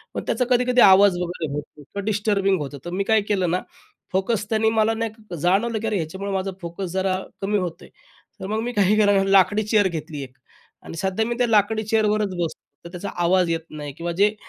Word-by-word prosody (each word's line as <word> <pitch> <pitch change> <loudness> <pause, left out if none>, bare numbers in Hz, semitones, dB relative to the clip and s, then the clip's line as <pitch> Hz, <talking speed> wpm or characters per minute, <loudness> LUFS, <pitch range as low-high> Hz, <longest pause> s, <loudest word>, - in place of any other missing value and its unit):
मग - - -2
त्याचा 250 - +1
कधी-कधी 250 0 +3
आवाज 195 -1 +7
वगैरे 175 -2 -3
होतो 150 0 -7
किंवा 200 +8 -7
डिस्टर्बिंग 205 -2 +1
होतं. 140 0 -6
तर - - -4
मी 195 +2 -1
काय 220 0 +3
केलं 190 -4 +1
ना, 180 - 0 0.5
फोकस 200 +2 0
त्यांनी 220 0 +2
मला 220 0 +2
नाही 220 -4 -5
जाणवलं 210 +6 +1
की 225 - -3
अरे 220 - -1
ह्याच्यामुळं 190 +4 -4
माझा 195 0 -1
फोकस 175 +2 -5
जरा 190 0 0 0.2
कमी 205 +2 0
होत 180 -4 -4
आहे. - - -14 0.5
तर 190 - -5
मग 215 +2 -1
मी 240 +2 -3
काही 205 -1 +3
केलं 205 -1 +4
ना, 195 - +3
लाकडी 195 +3 +4
चेअर 210 -1 +3
घेतली 160 -4 -5
एक 130 0 -13 0.5
आणि 165 - -9
सध्या 190 +5 0
मी 235 +1 -2
त्या 245 -1 +2
लाकडी 220 0 +2
चेअरवरच 215 -1 +1
बसतो. 170 -2 -3 0.2
तर - - -7
त्याचा 180 +2 -6
आवाज 180 0 +3
येत 165 0 -1
नाही 145 -2 -7
किंवा 170 +4 -4
जे 210 +1 +4
195 Hz, 215 wpm, -23 LUFS, 175-215 Hz, 0.5 s, आवाज